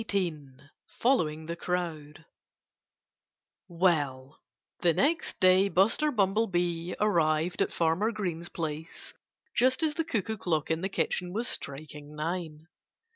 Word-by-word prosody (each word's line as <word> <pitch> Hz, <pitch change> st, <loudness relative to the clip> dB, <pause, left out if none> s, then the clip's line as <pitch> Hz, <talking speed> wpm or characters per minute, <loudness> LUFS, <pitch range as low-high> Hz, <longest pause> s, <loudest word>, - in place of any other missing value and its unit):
XVIII 155 Hz, -9 st, -2 dB, 0.3 s
FOLLOWING 160 Hz, -, 0 dB
THE 170 Hz, +1 st, -4 dB
CROWD 165 Hz, -3 st, -4 dB, 1.4 s
Well, 150 Hz, -7 st, 0 dB, 0.4 s
the 170 Hz, -2 st, +3 dB
next 320 Hz, +4 st, +1 dB
day 185 Hz, +2 st, +5 dB
Buster 200 Hz, -, +3 dB
Bumblebee 185 Hz, -, 0 dB
arrived 170 Hz, -3 st, +1 dB
at -, -, +1 dB
Farmer 170 Hz, +7 st, +1 dB
Green's 175 Hz, -6 st, -3 dB
place 160 Hz, 0 st, -6 dB, 0.4 s
just 255 Hz, +5 st, +3 dB
as 310 Hz, -1 st, +2 dB
the 325 Hz, -, -1 dB
cuckoo 220 Hz, -, -2 dB
clock 160 Hz, -5 st, -1 dB
in 160 Hz, +1 st, 0 dB
the 190 Hz, -, -1 dB
kitchen 180 Hz, -2 st, -1 dB
was 230 Hz, +4 st, -1 dB
striking 150 Hz, +1 st, -4 dB
nine. 160 Hz, -1 st, -4 dB
175 Hz, 120 wpm, -29 LUFS, 155-200 Hz, 1.4 s, day